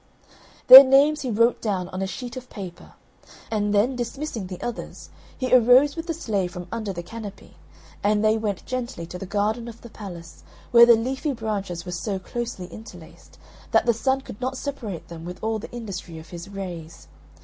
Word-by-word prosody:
Their 265 Hz, +2 st, +13 dB
names 280 Hz, +3 st, +4 dB
he 260 Hz, -, -3 dB
wrote 230 Hz, +2 st, +2 dB
down 190 Hz, -5 st, -2 dB
on 185 Hz, 0 st, -5 dB
a 195 Hz, -, -1 dB
sheet 245 Hz, +5 st, -7 dB
of 255 Hz, -1 st, -9 dB
paper; 185 Hz, -5 st, -9 dB, 0.6 s
and 210 Hz, -2 st, 0 dB
then, 210 Hz, +6 st, +2 dB
dismissing 240 Hz, -3 st, -4 dB
the 180 Hz, -1 st, -8 dB
others, 240 Hz, -1 st, -7 dB, 0.3 s
he 255 Hz, -1 st, -2 dB
arose 255 Hz, +4 st, +6 dB
with 330 Hz, +1 st, -6 dB
the 330 Hz, -, -1 dB
Slave 200 Hz, -, -2 dB
from 175 Hz, 0 st, -7 dB
under 220 Hz, -3 st, -3 dB
the 175 Hz, -2 st, -6 dB
canopy, 210 Hz, +1 st, -10 dB, 0.5 s
and 210 Hz, +1 st, +2 dB
they 215 Hz, 0 st, +4 dB
went 210 Hz, -4 st, -3 dB
gently 240 Hz, -9 st, -4 dB
to 180 Hz, +2 st, -8 dB
the 195 Hz, -, -7 dB
garden 215 Hz, +4 st, -1 dB
of 230 Hz, -1 st, -10 dB
the 235 Hz, -, -12 dB
palace, 170 Hz, -7 st, -10 dB, 0.3 s
where 235 Hz, 0 st, +8 dB
the 235 Hz, -, +8 dB
leafy 265 Hz, +6 st, -2 dB
branches 200 Hz, -7 st, -4 dB
were 180 Hz, -, -6 dB
so 190 Hz, +3 st, -3 dB
closely 230 Hz, -1 st, -5 dB
interlaced, 180 Hz, -7 st, -13 dB, 0.3 s
that -, -, +3 dB
the 235 Hz, -, +4 dB
Sun 265 Hz, +4 st, 0 dB
could 225 Hz, -3 st, -11 dB
not 260 Hz, +1 st, -2 dB
separate 235 Hz, -, -6 dB
them 165 Hz, -1 st, -9 dB
with 180 Hz, +1 st, -7 dB
all 220 Hz, 0 st, -1 dB
the -, -, -9 dB
industry 200 Hz, -8 st, -7 dB
of 160 Hz, -, -12 dB
his 170 Hz, +2 st, -9 dB
rays. 175 Hz, -5 st, -8 dB
215 Hz, 195 wpm, -24 LUFS, 185-245 Hz, 0.6 s, Their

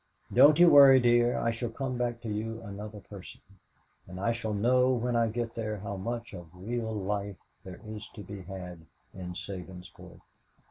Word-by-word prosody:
"Don't 150 Hz, +1 st, +7 dB
you 175 Hz, 0 st, +7 dB
worry, 140 Hz, -4 st, +9 dB
dear. 120 Hz, 0 st, +3 dB
I 115 Hz, -, 0 dB
shall 115 Hz, +1 st, -4 dB
come 130 Hz, +2 st, -4 dB
back 120 Hz, -1 st, -2 dB
to 120 Hz, -, -7 dB
you 110 Hz, +2 st, -4 dB
another 105 Hz, 0 st, -8 dB
person, 95 Hz, -1 st, -12 dB, 0.7 s
and 90 Hz, 0 st, -9 dB
I 100 Hz, +4 st, +1 dB
shall 110 Hz, -2 st, -3 dB
know 125 Hz, +4 st, +3 dB
when 125 Hz, -1 st, -1 dB
I 115 Hz, -1 st, +3 dB
get 115 Hz, +1 st, -3 dB
there 110 Hz, -2 st, -4 dB
how 100 Hz, 0 st, -6 dB
much 115 Hz, +4 st, -5 dB
of 85 Hz, -3 st, -9 dB
real 110 Hz, +4 st, -4 dB
life 100 Hz, -1 st, -3 dB, 0.3 s
there 90 Hz, -2 st, -10 dB
is 110 Hz, 0 st, -8 dB
to 105 Hz, -, -8 dB
be 100 Hz, -1 st, -8 dB
had 90 Hz, -3 st, -9 dB, 0.3 s
in 90 Hz, -1 st, -7 dB
Sabinsport." 90 Hz, -1 st, -9 dB
110 Hz, 180 wpm, -29 LUFS, 100-120 Hz, 0.7 s, worry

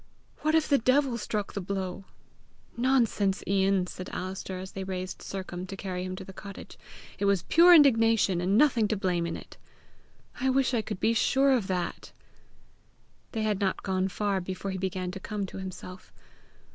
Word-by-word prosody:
What 310 Hz, +1 st, +1 dB
if 320 Hz, -1 st, +3 dB
the 280 Hz, -, +4 dB
devil 255 Hz, +1 st, +2 dB
struck 210 Hz, -1 st, -3 dB
the 200 Hz, -, -3 dB
blow!" 190 Hz, 0 st, -4 dB, 0.7 s
"Nonsense, 235 Hz, -6 st, +1 dB
Ian!" 195 Hz, -1 st, +2 dB
said 185 Hz, 0 st, -8 dB
Alister, 185 Hz, 0 st, -5 dB
as 185 Hz, +1 st, -7 dB
they 195 Hz, -, -5 dB
raised 185 Hz, 0 st, -5 dB
Sercombe 185 Hz, -1 st, -6 dB
to 195 Hz, -, -7 dB
carry 185 Hz, -2 st, -4 dB
him 185 Hz, 0 st, -4 dB
to 185 Hz, -, -8 dB
the 190 Hz, -, -10 dB
cottage. 200 Hz, +1 st, -10 dB, 0.4 s
"It 200 Hz, -, 0 dB
was 200 Hz, -3 st, +2 dB
pure 345 Hz, +2 st, +7 dB
indignation, 225 Hz, -, +4 dB
and 190 Hz, +3 st, +2 dB
nothing 245 Hz, -6 st, +4 dB
to 215 Hz, -, -1 dB
blame 180 Hz, -3 st, 0 dB
in 165 Hz, -, -4 dB
it!" -, -, -13 dB, 0.8 s
"I 265 Hz, +1 st, +1 dB
wish 265 Hz, 0 st, +2 dB
I 235 Hz, -, +2 dB
could 210 Hz, -3 st, -6 dB
be 225 Hz, -, +2 dB
sure 270 Hz, +4 st, +3 dB
of 240 Hz, -7 st, +2 dB
that!" 180 Hz, -2 st, -3 dB, 1.2 s
They 220 Hz, -2 st, -1 dB
had 210 Hz, -2 st, 0 dB
not 195 Hz, -2 st, -1 dB
gone 190 Hz, -1 st, 0 dB
far 195 Hz, 0 st, -1 dB
before 185 Hz, +2 st, -5 dB
he 190 Hz, -, -4 dB
began 185 Hz, -1 st, -3 dB
to 195 Hz, -, -7 dB
come 205 Hz, 0 st, -4 dB
to 190 Hz, -, -9 dB
himself. 185 Hz, 0 st, -9 dB
195 Hz, 185 wpm, -28 LUFS, 185-225 Hz, 1.2 s, pure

